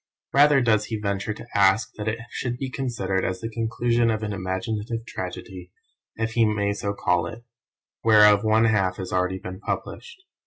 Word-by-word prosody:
Rather 145 0 +6
does 110 -3 +2
he 110 -1 -4
venture 100 0 -2
to 105 - -8
ask 100 +2 +3
that 105 0 -6
it 110 +1 0
should 120 -1 -3
be 130 0 -4
considered 115 -9 -2
as 90 - -2
the 115 - -4
conclusion 115 +1 +1
of 110 -1 -1
an 105 -1 -2
imaginative 105 +4 -3
tragedy 90 -2 -7 0.4
(if 110 0 -2
he 115 0 +3
may 105 -2 +1
so 100 0 -3
call 90 -4 0
it) 115 +6 -9 0.6
whereof 105 -2 +6
one 110 +1 +4
half 95 -4 +1
has 95 - -6
been 90 - +1
already 90 +1 -1 0.2
published. 380 - -5
110 Hz, 180 wpm, -24 LUFS, 95-115 Hz, 0.6 s, Rather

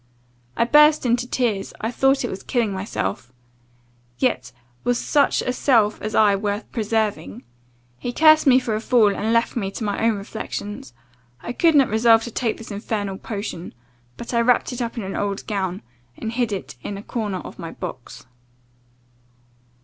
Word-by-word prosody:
I - - +4
burst 300 +3 +5
into 245 0 +1
tears, 220 -6 -1
I 225 - -2
thought 270 +1 +2
it - - -3
was 190 - -6
killing 230 -5 -1
myself 125 - -4 0.9
yet 125 0 0 0.3
was 245 0 +1
such 285 +2 +2
a 250 - -1
self 225 -6 +2
as 215 - -4
I 210 -2 +5
worth 205 +1 -3
preserving? 215 - -2 0.6
He 245 - -3
cursed 310 +2 +5
me 255 -1 +7
for 245 -4 -1
a 215 - -1
fool, 225 -4 +3
and 220 +2 -1
left 230 0 +1
me 200 -5 -1
to 210 - -6
my 205 +1 -2
own 225 -1 +3
reflections. 205 +3 -6 0.5
I 240 - -5
could 330 +3 +3
not 275 -3 +6
resolve 225 +1 +4
to 235 - -6
take 230 0 -1
this 225 - -10
infernal 205 -1 -3
potion; 200 - -6 0.4
but 235 - -7
I 235 - +3
wrapped 250 +1 +2
it 245 - -5
up 235 0 -4
in 230 - -3
an 195 - -5
old 200 -1 -2
gown, 190 - -3 0.3
and 220 - -4
hid 235 -1 -1
it 145 -9 -5
in 200 - -5
a 200 - -9
corner 210 -6 -3
of - - -10
my 165 -2 -6
box. 125 -6 -8
220 Hz, 180 wpm, -22 LUFS, 200-245 Hz, 0.9 s, me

